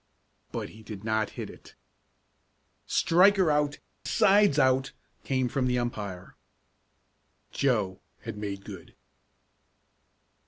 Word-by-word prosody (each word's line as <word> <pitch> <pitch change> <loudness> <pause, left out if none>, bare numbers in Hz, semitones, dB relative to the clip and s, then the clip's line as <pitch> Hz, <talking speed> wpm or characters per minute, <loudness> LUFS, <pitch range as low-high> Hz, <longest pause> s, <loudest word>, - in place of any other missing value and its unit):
But - - -4
he 110 - -14
did 105 -2 -9
not 110 -1 0
hit - - -4
it. - - -16 1.1
"Striker 185 0 +4
out 145 0 +1 0.3
side's 200 -6 +4
out!" 130 -1 +2 0.3
came 130 -2 0
from 130 +1 -1
the 125 0 +1
umpire. 105 -7 -4 1.2
Joe 105 -9 0 0.2
had 115 -2 -6
made 100 -2 -5
good. 95 -5 -10
125 Hz, 105 wpm, -28 LUFS, 105-145 Hz, 1.2 s, Striker